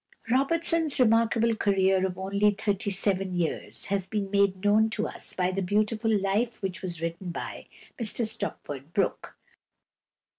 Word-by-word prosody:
Robertson's 320 Hz, +3 st, +2 dB
remarkable 230 Hz, -1 st, +3 dB
career 190 Hz, -2 st, +2 dB
of 180 Hz, -1 st, -7 dB
only 200 Hz, +2 st, +2 dB
thirty 205 Hz, -1 st, -1 dB
seven 195 Hz, -1 st, +1 dB
years 170 Hz, -2 st, -2 dB
has 195 Hz, -2 st, -1 dB
been 200 Hz, -3 st, -3 dB
made 200 Hz, -1 st, +1 dB
known 215 Hz, +2 st, +4 dB
to 220 Hz, -1 st, -2 dB
us -, -, -2 dB
by 180 Hz, 0 st, +1 dB
the 195 Hz, +1 st, -2 dB
beautiful 215 Hz, +4 st, 0 dB
life 205 Hz, +4 st, -1 dB
which 190 Hz, -2 st, -3 dB
was 170 Hz, -3 st, -5 dB
written 170 Hz, +2 st, -4 dB
by 170 Hz, -, -6 dB, 0.3 s
Mr 230 Hz, +1 st, 0 dB
Stopford 145 Hz, -7 st, -5 dB
Brooke. 200 Hz, -, -1 dB
200 Hz, 145 wpm, -27 LUFS, 190-220 Hz, 0.3 s, known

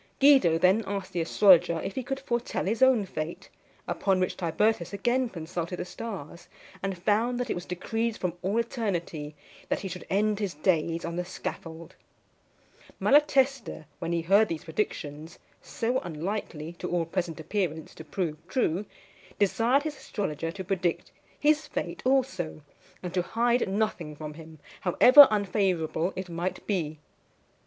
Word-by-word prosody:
Guido 270 Hz, -, +6 dB
then 185 Hz, +6 st, +4 dB
asked 195 Hz, -2 st, -4 dB
the 175 Hz, -, 0 dB
astrologer 175 Hz, -1 st, +5 dB
if 195 Hz, -, -4 dB
he 260 Hz, -, -2 dB
could 270 Hz, +2 st, -4 dB
foretell 240 Hz, -3 st, -2 dB
his 220 Hz, +6 st, -1 dB
own 260 Hz, -6 st, +5 dB
fate; 160 Hz, -2 st, -6 dB, 0.4 s
upon 190 Hz, -2 st, +1 dB
which 185 Hz, -, 0 dB
Tibertus 180 Hz, +2 st, 0 dB
again 240 Hz, +5 st, +1 dB
consulted 170 Hz, -1 st, -5 dB
the -, -, -4 dB
stars, 175 Hz, -5 st, -8 dB, 0.3 s
and 195 Hz, -1 st, -3 dB
found 220 Hz, +7 st, +1 dB
that 245 Hz, -2 st, -2 dB
it -, -, +2 dB
was 175 Hz, +1 st, -6 dB
decreed 225 Hz, +5 st, -2 dB
from 180 Hz, -2 st, -2 dB
all 195 Hz, +4 st, -1 dB
eternity 175 Hz, -, -2 dB, 0.3 s
that -, -, 0 dB
he 195 Hz, -, -4 dB
should 180 Hz, 0 st, -8 dB
end 210 Hz, +1 st, +1 dB
his 200 Hz, -6 st, -2 dB
days 165 Hz, +1 st, 0 dB
on 170 Hz, 0 st, -4 dB
the 180 Hz, -, 0 dB
scaffold. 165 Hz, -2 st, -7 dB, 1.1 s
Malatesta, 275 Hz, -, +3 dB
when 165 Hz, -, -3 dB
he 170 Hz, -1 st, +1 dB
heard 200 Hz, +5 st, +5 dB
these 165 Hz, -4 st, -4 dB
predictions, 160 Hz, -3 st, -4 dB, 0.2 s
so 245 Hz, +3 st, -1 dB
unlikely, 170 Hz, -2 st, -5 dB
to -, -, -4 dB
all 175 Hz, -2 st, 0 dB
present 170 Hz, -1 st, -3 dB
appearance, 160 Hz, -2 st, -3 dB
to -, -, -10 dB
prove 155 Hz, 0 st, -3 dB
true, 190 Hz, -3 st, 0 dB, 0.5 s
desired 230 Hz, +7 st, +2 dB
his 305 Hz, -2 st, -4 dB
astrologer 165 Hz, -, -3 dB
to 190 Hz, +2 st, -6 dB
predict 185 Hz, -2 st, -1 dB, 0.3 s
his 305 Hz, +1 st, +3 dB
fate -, -, -4 dB
also, 250 Hz, -, 0 dB, 0.4 s
and 180 Hz, -1 st, -5 dB
to 180 Hz, -, +2 dB
hide 235 Hz, +4 st, +1 dB
nothing 195 Hz, -7 st, -1 dB
from 150 Hz, 0 st, -7 dB
him, 160 Hz, 0 st, -12 dB, 0.2 s
however 255 Hz, +10 st, +8 dB
unfavourable 185 Hz, -5 st, 0 dB
it 185 Hz, 0 st, -5 dB
might 175 Hz, +2 st, -4 dB
be. 160 Hz, -7 st, -2 dB
185 Hz, 155 wpm, -28 LUFS, 165-225 Hz, 1.1 s, however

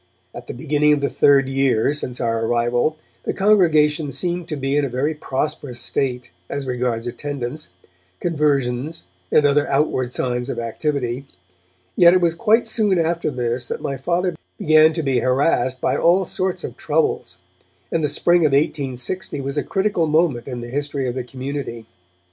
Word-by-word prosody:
At -, -, -9 dB
the -, -, -6 dB
beginning 150 Hz, +2 st, +2 dB
of 145 Hz, -, 0 dB
the 140 Hz, -, 0 dB
third 140 Hz, -2 st, +4 dB
year 135 Hz, -1 st, +1 dB
since 125 Hz, -4 st, -4 dB
our 115 Hz, -1 st, 0 dB
arrival, 120 Hz, +6 st, +1 dB, 0.2 s
the -, -, -3 dB
congregation 160 Hz, -7 st, +3 dB
seemed 175 Hz, +5 st, -2 dB
to 155 Hz, -, -2 dB
be 135 Hz, 0 st, -1 dB
in 145 Hz, -, +2 dB
a 140 Hz, -, -1 dB
very 135 Hz, +6 st, -1 dB
prosperous 140 Hz, -3 st, -3 dB
state, 125 Hz, 0 st, -1 dB, 0.2 s
as 140 Hz, -1 st, -4 dB
regards 125 Hz, -2 st, -2 dB
attendance, 130 Hz, -, -5 dB, 0.5 s
conversions 145 Hz, -2 st, 0 dB, 0.3 s
and 150 Hz, -, +4 dB
other 145 Hz, 0 st, +3 dB
outward 135 Hz, -3 st, 0 dB
signs 125 Hz, 0 st, -2 dB
of -, -, -3 dB
activity. 125 Hz, +2 st, -2 dB, 0.7 s
Yet 175 Hz, 0 st, +7 dB
it -, -, +5 dB
was 170 Hz, -2 st, +2 dB
quite 220 Hz, +6 st, +3 dB
soon 215 Hz, -4 st, +1 dB
after 170 Hz, 0 st, 0 dB
this 120 Hz, -2 st, -2 dB
that -, -, -4 dB
my 140 Hz, -, -3 dB
Father 175 Hz, +6 st, -1 dB, 0.2 s
began 155 Hz, 0 st, +5 dB
to 165 Hz, 0 st, -2 dB
be 135 Hz, -3 st, +1 dB
harassed 130 Hz, +1 st, +1 dB
by -, -, 0 dB
all 180 Hz, +3 st, +3 dB
sorts 185 Hz, +1 st, -2 dB
of -, -, -6 dB
troubles, 450 Hz, -1 st, -1 dB, 0.5 s
and 165 Hz, -, 0 dB
the 150 Hz, -, +1 dB
spring 175 Hz, +4 st, +3 dB
of 155 Hz, -4 st, +2 dB
1860 140 Hz, +2 st, -1 dB
was 140 Hz, +1 st, -4 dB
a 145 Hz, -, +1 dB
critical 190 Hz, -3 st, 0 dB
moment 155 Hz, -6 st, +1 dB
in 125 Hz, -3 st, -5 dB
the 120 Hz, -, -7 dB
history 140 Hz, 0 st, -2 dB
of 120 Hz, -, -2 dB
the 130 Hz, 0 st, -3 dB
community. 130 Hz, -2 st, -6 dB
140 Hz, 170 wpm, -21 LUFS, 125-160 Hz, 0.7 s, Yet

